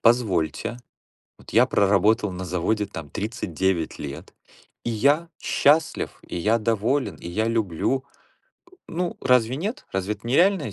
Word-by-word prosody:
"Позвольте, 115 -2 +1 0.6
вот - - -14
я - - +6
проработал 105 +2 +3
на 90 +1 -5
заводе, 95 +4 0
там, 80 -7 -8
39 95 - -2
лет, 70 -1 -8 0.5
и - - -2
я 145 +9 +2
счастлив, 155 +3 +2
и - - -6
я 110 +7 +2
доволен, 115 +5 0
и 85 - -8
я 110 +5 0
люблю". 115 +4 0 0.7
Э, - - -29 0.2
ну, 175 +1 -2
разве 125 -1 +3
нет? 215 - -4
Разве 95 +2 -1
это 105 +2 -14
нереальная 160 - +3
110 Hz, 140 wpm, -24 LUFS, 95-130 Hz, 0.7 s, я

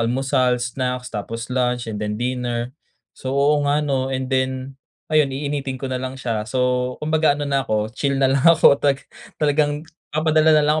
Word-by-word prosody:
almusal, 125 +1 +1
snacks 125 0 -3
tapos 115 +4 -5
lunch 125 -1 0
and 105 - -5
then 105 0 -2
dinner. 120 0 -2 0.4
So, 130 +1 -4
oo 145 +1 +3
nga, 150 +1 +2
'no, 135 -2 0
and 130 0 -3
then, 130 +1 -2 0.3
ayun, 150 -2 +4
iinitin 140 -1 -3
ko 135 - -7
na 130 -1 -2
lang 130 +1 -5
siya. 110 -4 -3
So, 125 0 0
kumbaga 155 -1 +2
ano 145 - -3
na 140 -1 +1
ako, 110 -2 -1
chill 140 +1 -1
na 135 - +2
lang 135 +1 +3
ako. 165 -4 +7
Talaga 140 -1 +1 0.3
talagang 150 0 +1 0.3
papadala 155 0 +3
na 150 - +4
lang 150 +1 +2
130 Hz, 185 wpm, -21 LUFS, 125-145 Hz, 0.4 s, ako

